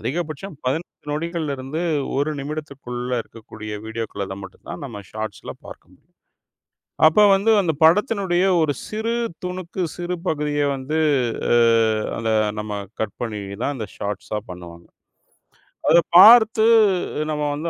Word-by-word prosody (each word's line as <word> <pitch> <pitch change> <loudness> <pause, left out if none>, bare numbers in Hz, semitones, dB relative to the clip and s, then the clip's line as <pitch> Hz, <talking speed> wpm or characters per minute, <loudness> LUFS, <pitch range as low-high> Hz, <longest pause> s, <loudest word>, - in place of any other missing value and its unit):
அதிகபட்சம் 165 +4 -4
15 150 +2 -4
நொடிகள்லிருந்து 155 -3 -3 0.4
1 145 +3 0
நிமிடத்திற்குள்ள 135 -4 -6
இருக்கக்கூடிய 110 -1 -10
வீடியோக்கள 105 -4 -5
மட்டும் 95 - -15
தான் - - -7
நாம 105 -6 -8
ஷாட்ஸ்ல 110 0 -6
பார்க்கம் - - -13 1.1
அப்ப 165 +7 +4
வந்து 200 +3 +3
அந்த 175 -4 +1
படத்தினுடைய 190 0 +3 0.2
ஒரு 150 -3 +1
சிறு 220 +2 -3 0.3
துணுக்கு, 180 0 -5
சிறு 175 0 -3
பகுதிய 150 -2 -1
வந்து 135 +4 -3 0.5
அ 120 - +4 0.6
அத 115 -1 -2 0.3
நம்ம 105 0 -5 0.3
கட் 105 -3 -3
பண்ணி 110 -4 -3 0.2
தான் 145 - -1
அந்த 110 -5 -5
ஷாட்ஸா 105 +1 -4
பண்ணுவாங்க. 85 -1 -10 1.0
அத 170 - +7 0.2
பார்த்து 220 +2 +8 0.7
நம்ம 150 0 -2
வந்து 160 +3 -3
145 Hz, 120 wpm, -22 LUFS, 115-175 Hz, 1.1 s, பார்த்து